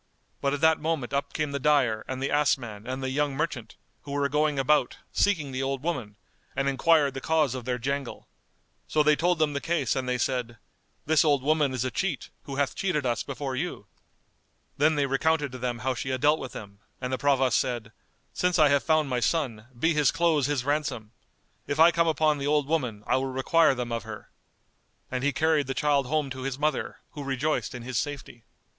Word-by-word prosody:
but 140 - +1
at 145 0 -2
that 160 0 +4
moment 155 -5 -2
up 140 0 -1
came 155 -2 -2
the 140 - -2
dyer 130 -6 +2
and 130 0 -4
the 140 - -1
ass 145 -2 +3
man 110 -4 -9
and 130 +1 -4
the 130 - -2
young 145 0 0
merchant, 150 -7 -3 0.3
who 140 - -10
were 140 0 +1
going 150 0 +1
about, 135 -1 +2
seeking 160 -9 +1
the 130 0 -3
old 135 0 -2
woman, 125 -12 -3 0.4
and 140 0 0
enquired 145 +1 +3
the 135 - -6
cause 155 -5 +2
of 130 -2 -6
their 125 -1 -1
jangle. 140 +2 -4 0.6
So 155 - +2
they 150 0 +5
told 175 +3 +1
them 155 -2 +1
the 140 - -2
case 165 -7 0
and 130 -1 -2
they 125 - +1
said, 120 -1 -2 0.5
"This 155 0 +4
old 145 -4 +2
woman 150 -1 +2
is 130 -1 -2
a 130 - -2
cheat, 190 - -2
who 140 - -6
hath 140 0 0
cheated 170 -8 -1
us 120 -1 0
before 140 -1 -4
you." 130 - -4 0.9
Then 155 +2 +3
they 145 -1 +2
recounted 145 +1 +1
to 130 - -8
them 120 -1 -2
how 130 - +2
she 130 +2 -4
had 130 -1 -2
dealt 150 +2 +4
with 130 - -7
them, 100 -2 -10 0.2
and 125 0 -3
the 130 - -1
Provost 135 -3 +3
said, 120 -4 -3 0.4
"Since 180 0 +1
I 155 -3 +6
have 140 0 +3
found 155 -2 +2
my 125 -2 0
son, 120 -5 -1
be 165 +7 +2
his 150 -3 +3
clothes 160 -4 +2
his 140 -4 -1
ransom! 145 -7 -2 0.6
If 145 - -2
I 165 +2 +8
come 170 0 +2
upon 155 -2 +2
the 140 - -2
old 150 -1 +2
woman, 125 -10 -1
I - - +2
will 135 +1 -1
require 135 +3 +3
them 120 -1 -4
of 115 0 -1
her." 110 -2 -10 0.8
And 130 0 -2
he 145 - +2
carried 155 0 +1
the 135 - -3
child 145 -3 +2
home 150 -1 -1
to 130 0 -6
his 135 0 -3
mother, 150 +1 -2
who 145 -1 -7
rejoiced 135 +1 -1
in 120 - -7
his 125 -2 -2
safety. 140 -5 -6
140 Hz, 220 wpm, -27 LUFS, 130-150 Hz, 0.9 s, I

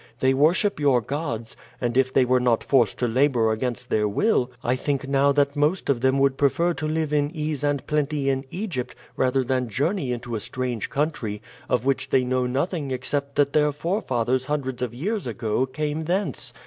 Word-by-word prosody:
They 130 0 +3
worship 160 +7 +2
your 140 -4 +4
gods, 120 -3 -4 0.2
and 120 -2 -1
if 130 0 +3
they 130 -1 +4
were 125 +1 +3
not 125 -2 +2
forced 120 -7 +2
to 125 - 0
labor 120 -2 +2
against 125 +2 -3
their 105 -1 +2
will 125 - +1
I 125 - +1
think 140 +1 -2
now 140 +1 +3
that 140 0 +2
most 150 +2 +1
of 120 -4 -1
them 130 +1 +3
would 135 -1 +2
prefer 170 +5 +2
to 155 - -4
live 155 -1 -1
in 145 -1 +2
ease 150 -2 -2
and 145 -3 0
plenty 150 -1 0
in 135 -1 +1
Egypt 170 - -4 0.2
rather 130 +1 +1
than 130 -1 -1
journey 145 - -1
into 120 0 -4
a 110 - -1
strange 125 0 -3
country, 140 -8 -2 0.3
of 120 - +1
which 135 -1 0
they 130 - +3
know 125 0 0
nothing 140 +3 -1
except 140 +2 -3
that 140 -1 +2
their 150 -1 +3
forefathers 130 - -1
hundreds 135 -4 -3
of 120 -2 -3
years 195 - -2
ago 115 +2 -1
came 150 +3 -3
thence. 190 +5 -1
135 Hz, 195 wpm, -24 LUFS, 125-150 Hz, 0.3 s, your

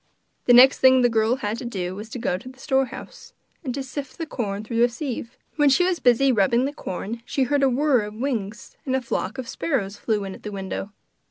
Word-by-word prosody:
The 245 - +5
next 255 +3 +8
thing 260 -1 +6
the 245 - +5
girl 225 +1 +2
had 220 -3 -3
to - - -7
do 185 -6 -3
was 210 +3 -8
to 250 - -6
go 225 - -1
to 195 +8 -8
the 260 - -15
storehouse, 270 - -3 0.3
and 265 - -3
to 275 - -3
sift 275 0 -7
the 330 - -3
corn 210 -8 -4
through 230 +2 -1
a 240 - +5
sieve. 245 -2 -6 0.2
While 295 -2 +5
she 275 +7 +4
was 365 -2 0
busy 255 +2 +4
rubbing 235 +3 +2
the 285 - -3
corn 225 - -5
she 270 - -1
heard 285 +2 +1
a 270 - +4
whirr 260 -3 +2
of 210 0 -9
wings, 230 -4 -4
and 260 -4 -1
a 265 - 0
flock 235 -1 -3
of 255 -2 -5
sparrows 210 -11 -2
flew 210 -1 -1
in 195 -1 -6
at - - -12
the 210 - -6
window. 195 0 -5
245 Hz, 240 wpm, -23 LUFS, 210-270 Hz, 0.3 s, next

